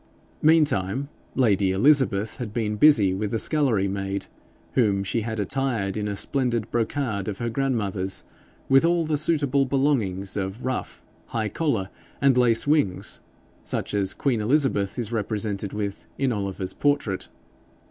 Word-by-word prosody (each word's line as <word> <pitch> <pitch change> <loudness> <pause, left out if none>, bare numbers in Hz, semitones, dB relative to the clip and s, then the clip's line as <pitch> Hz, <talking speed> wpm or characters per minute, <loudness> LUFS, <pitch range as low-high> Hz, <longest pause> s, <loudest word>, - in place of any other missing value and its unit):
Meantime 140 - +2 0.3
lady 100 -7 +3
Elizabeth 110 -1 +3
had 120 -5 -5
been 105 -1 -1
busy 105 -7 +5
with 100 +2 -2
the 115 - -1
scullery 120 -8 +1
maid, 100 0 -3 0.5
whom 100 -6 +2
she 115 +4 -1
had 110 0 -4
attired 110 -3 -1
in 105 -1 -2
a 100 - -2
splendid 120 -1 -1
brocade 115 -4 -1
of 100 -2 -3
her 120 0 -3
grandmother's, 105 -8 -1 0.4
with 135 +2 +5
all 170 0 +2
suitable 145 -3 +1
belongings 130 -9 0
of 100 +4 -4
ruff, 130 -1 -4 0.2
high 110 -2 -2
collar, 115 - -1 0.3
and 140 -2 +4
lace 120 -2 +3
wings, 145 -11 0 0.4
such - - -3
as 100 -2 0
Queen 125 -6 0
Elizabeth 120 -5 +1
is 115 -3 -3
represented 105 -2 -2
with 100 -1 -5
in 135 -2 +1
Oliver's 100 -3 -3
portrait. 145 -10 0
110 Hz, 140 wpm, -24 LUFS, 100-135 Hz, 0.5 s, busy